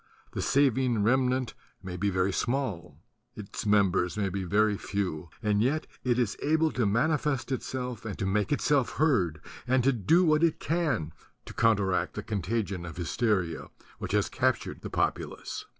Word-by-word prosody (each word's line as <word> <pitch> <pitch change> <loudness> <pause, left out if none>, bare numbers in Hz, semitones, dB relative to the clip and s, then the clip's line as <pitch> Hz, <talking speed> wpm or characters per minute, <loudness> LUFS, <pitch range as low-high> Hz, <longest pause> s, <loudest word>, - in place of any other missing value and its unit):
The - - -3
saving 130 -5 +2
remnant 125 0 +1 0.3
may 90 -1 -6
be 100 +3 0
very 95 0 +1
small; 100 - -2 0.4
its 105 +1 -6
members 95 -3 +2
may 100 -2 0
be 95 +1 -3
very 105 +3 +2
few; 90 -6 -3
and 105 -1 +2
yet 145 +7 +1 0.2
it 125 -2 +1
is 120 -5 0
able 160 +1 +2
to 120 -4 0
manifest 135 +4 0
itself 125 -3 -4
and 105 -4 -5
to - - -2
make 100 +4 0
itself 145 -3 +2
heard 95 - +1 0.3
and 130 0 +3
to 135 +2 +4
do 160 - +3
what 155 0 +3
it 165 -2 +2
can 155 - -1 0.3
to - - -9
counteract 100 -5 +1
the - - -4
contagion 100 -2 -2
of 85 -1 -8
hysteria 90 -1 -1 0.3
which - - -5
has 105 -1 +2
captured 130 -1 -1
the - - -6
populace. - - -2
110 Hz, 165 wpm, -28 LUFS, 95-130 Hz, 0.4 s, to